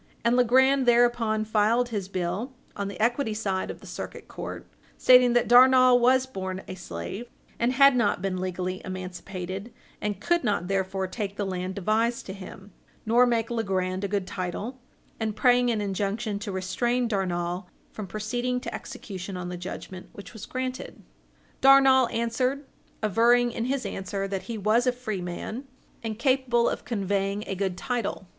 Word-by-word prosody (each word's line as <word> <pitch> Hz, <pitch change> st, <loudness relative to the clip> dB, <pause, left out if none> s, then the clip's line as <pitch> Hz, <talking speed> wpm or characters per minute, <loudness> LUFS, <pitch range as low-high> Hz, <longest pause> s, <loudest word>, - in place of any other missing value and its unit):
And 235 Hz, +1 st, +4 dB
Legrand 260 Hz, +2 st, +4 dB
thereupon 235 Hz, -2 st, +3 dB
filed 220 Hz, +3 st, +2 dB
his 205 Hz, -5 st, -3 dB
bill 190 Hz, +7 st, -3 dB, 0.2 s
on 200 Hz, -, -3 dB
the 200 Hz, -2 st, -7 dB
equity 235 Hz, 0 st, +1 dB
side 195 Hz, -3 st, -2 dB
of -, -, -7 dB
the -, -, -13 dB
Circuit -, -, -7 dB
Court, -, -, -7 dB, 0.3 s
stating 250 Hz, -1 st, +6 dB
that 240 Hz, -1 st, +3 dB
Darnall 255 Hz, 0 st, +7 dB
was 255 Hz, +2 st, +4 dB
born 190 Hz, -6 st, -5 dB
a -, -, -5 dB
slave, 190 Hz, +4 st, -6 dB, 0.3 s
and 240 Hz, +2 st, +2 dB
had 275 Hz, 0 st, +6 dB
not 225 Hz, -7 st, +2 dB
been 185 Hz, 0 st, -2 dB
legally 185 Hz, 0 st, -3 dB
emancipated, 185 Hz, +2 st, -6 dB, 0.3 s
and 205 Hz, -2 st, -2 dB
could 345 Hz, +8 st, +1 dB
not 205 Hz, -6 st, 0 dB
therefore 190 Hz, 0 st, -1 dB
take 200 Hz, +1 st, -4 dB
the 205 Hz, -, -2 dB
land 185 Hz, 0 st, -3 dB
devised 220 Hz, +4 st, 0 dB
to 190 Hz, -, -6 dB
him, 195 Hz, +1 st, -11 dB, 0.3 s
nor 240 Hz, +3 st, +5 dB
make 230 Hz, -1 st, 0 dB
Legrand 190 Hz, -4 st, -1 dB
a -, -, 0 dB
good 200 Hz, -1 st, -1 dB
title, 185 Hz, +8 st, -5 dB, 0.4 s
and 220 Hz, -2 st, -2 dB
praying 245 Hz, +1 st, +4 dB
an 220 Hz, -3 st, 0 dB
injunction 205 Hz, +2 st, -2 dB
to 205 Hz, -1 st, -5 dB
restrain 240 Hz, +7 st, 0 dB
Darnall 180 Hz, -3 st, -2 dB, 0.2 s
from 210 Hz, -3 st, -7 dB
proceeding 245 Hz, +6 st, -2 dB
to -, -, -6 dB
execution 190 Hz, -2 st, -7 dB
on 180 Hz, 0 st, -5 dB
the 180 Hz, -, -5 dB
judgment, 185 Hz, +1 st, -8 dB
which 200 Hz, -, -11 dB
was 220 Hz, -, -9 dB
granted. 255 Hz, 0 st, -5 dB, 0.6 s
Darnall 270 Hz, -2 st, +6 dB
answered, 250 Hz, +5 st, -1 dB, 0.4 s
averring 235 Hz, +4 st, +4 dB
in 230 Hz, -, -3 dB
his 265 Hz, +1 st, -1 dB
answer 195 Hz, +1 st, -3 dB
that 195 Hz, -1 st, -3 dB
he 230 Hz, -, -3 dB
was 215 Hz, +5 st, +2 dB
a -, -, +5 dB
free 245 Hz, -6 st, -4 dB
man, 195 Hz, +9 st, -5 dB, 0.4 s
and 220 Hz, -2 st, -4 dB
capable 255 Hz, -2 st, +2 dB
of -, -, -3 dB
conveying 200 Hz, -2 st, -1 dB
a -, -, -3 dB
good 190 Hz, -1 st, -2 dB
title. 235 Hz, -3 st, -3 dB
215 Hz, 165 wpm, -26 LUFS, 190-245 Hz, 0.6 s, Darnall